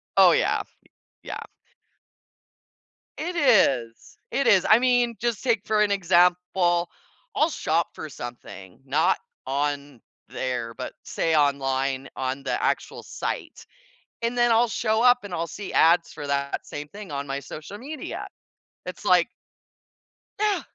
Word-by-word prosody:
Oh, -, -, +7 dB
yeah. -, -, +2 dB, 0.6 s
Yeah. -, -, -6 dB, 1.8 s
It 350 Hz, +3 st, -4 dB
is, 140 Hz, -, +2 dB
it 275 Hz, -, 0 dB
is 190 Hz, -5 st, +5 dB
I 215 Hz, -, +8 dB
mean, 245 Hz, -2 st, +2 dB
just 235 Hz, -1 st, -1 dB
take 225 Hz, -5 st, +1 dB
for 215 Hz, -1 st, +2 dB
an 210 Hz, -, +3 dB
example, 180 Hz, -1 st, +2 dB, 0.5 s
I'll 335 Hz, -4 st, +3 dB
shop 165 Hz, -, 0 dB
for 155 Hz, -, -7 dB
something 120 Hz, -8 st, -9 dB
not -, -, +2 dB, 0.3 s
on 140 Hz, -1 st, -2 dB, 0.3 s
there, 120 Hz, -3 st, -3 dB
but 130 Hz, -, -6 dB
say 165 Hz, -1 st, 0 dB
online 135 Hz, -2 st, +1 dB
on 130 Hz, +1 st, -3 dB
the -, -, -1 dB
actual -, -, -1 dB
site, -, -, -5 dB, 0.6 s
and 235 Hz, +1 st, -1 dB
then 240 Hz, 0 st, +4 dB
I'll 230 Hz, +2 st, +4 dB
show 220 Hz, 0 st, 0 dB
up 245 Hz, 0 st, +6 dB
and 195 Hz, -3 st, -8 dB
I'll 170 Hz, 0 st, -2 dB
see 200 Hz, +2 st, -7 dB
ads 170 Hz, +1 st, +4 dB
for 145 Hz, -, -7 dB
that 140 Hz, 0 st, -2 dB
same 145 Hz, 0 st, -6 dB
thing 200 Hz, -2 st, -10 dB
on 140 Hz, 0 st, -3 dB
my 135 Hz, 0 st, -2 dB
social 155 Hz, +7 st, -9 dB
media. 280 Hz, +6 st, -6 dB, 0.6 s
It's -, -, -7 dB
like -, -, +4 dB, 1.1 s
Yeah! 420 Hz, -1 st, +1 dB
175 Hz, 140 wpm, -25 LUFS, 140-230 Hz, 1.8 s, I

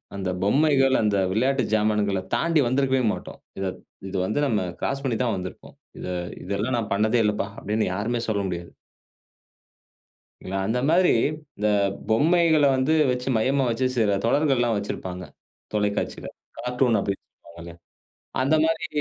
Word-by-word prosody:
அந்த 95 Hz, -2 st, -3 dB
பொம்மைகள், 135 Hz, +3 st, +3 dB
அந்த 105 Hz, -1 st, +2 dB, 0.2 s
விளையாட்டு 130 Hz, +4 st, +1 dB
ஜாமான்கள 105 Hz, -2 st, +1 dB, 0.2 s
தாண்டி 165 Hz, -2 st, +2 dB
வந்திருக்கவே 130 Hz, 0 st, +1 dB
மாட்டோம். -, -, -8 dB, 0.2 s
இத 95 Hz, -, -2 dB, 0.4 s
இது 95 Hz, -, -3 dB
வந்து 110 Hz, +9 st, -1 dB
நம்ம 105 Hz, -5 st, +1 dB, 0.2 s
கிராஸ் 140 Hz, 0 st, -2 dB
பண்ணிதான் 120 Hz, -3 st, 0 dB
வந்திருப்போம். 90 Hz, 0 st, -8 dB, 0.2 s
"இத -, -, -6 dB, 0.4 s
இதெல்லாம் 100 Hz, +6 st, -1 dB
நான் 110 Hz, -2 st, -3 dB
பண்ணதே 110 Hz, +4 st, +2 dB
இல்லப்பா" 105 Hz, -1 st, 0 dB
அப்படின்னு 105 Hz, +2 st, -1 dB
யாருமே 115 Hz, +5 st, -1 dB
சொல்ல 105 Hz, -2 st, 0 dB
முடியாது. 85 Hz, -1 st, -6 dB, 1.7 s
இதுல 95 Hz, -, -5 dB
அந்த 120 Hz, +3 st, 0 dB
மாதிரி, 180 Hz, +2 st, +4 dB, 0.5 s
இந்த 105 Hz, +1 st, 0 dB, 0.4 s
பொம்மைகள 160 Hz, +5 st, +4 dB
வந்து 130 Hz, +4 st, +1 dB, 0.2 s
வச்சு, 125 Hz, 0 st, -3 dB
மையமா 135 Hz, +5 st, +2 dB
வச்சு 130 Hz, +3 st, 0 dB
சில 100 Hz, -3 st, +2 dB
தொடர்கள்லாம் 125 Hz, -3 st, +2 dB
வச்சிருப்பாங்க 95 Hz, -3 st, -5 dB, 0.5 s
தொலைக்காட்சியில. 105 Hz, -1 st, -1 dB, 0.3 s
கார்ட்டூன் 125 Hz, -1 st, +1 dB
அப்படின்னு 100 Hz, 0 st, -3 dB, 0.2 s
சொல்வாங்க. 85 Hz, 0 st, -10 dB, 0.7 s
அந்த 140 Hz, +4 st, +3 dB
மாரி 160 Hz, 0 st, -1 dB
115 Hz, 135 wpm, -24 LUFS, 100-135 Hz, 1.7 s, மாதிரி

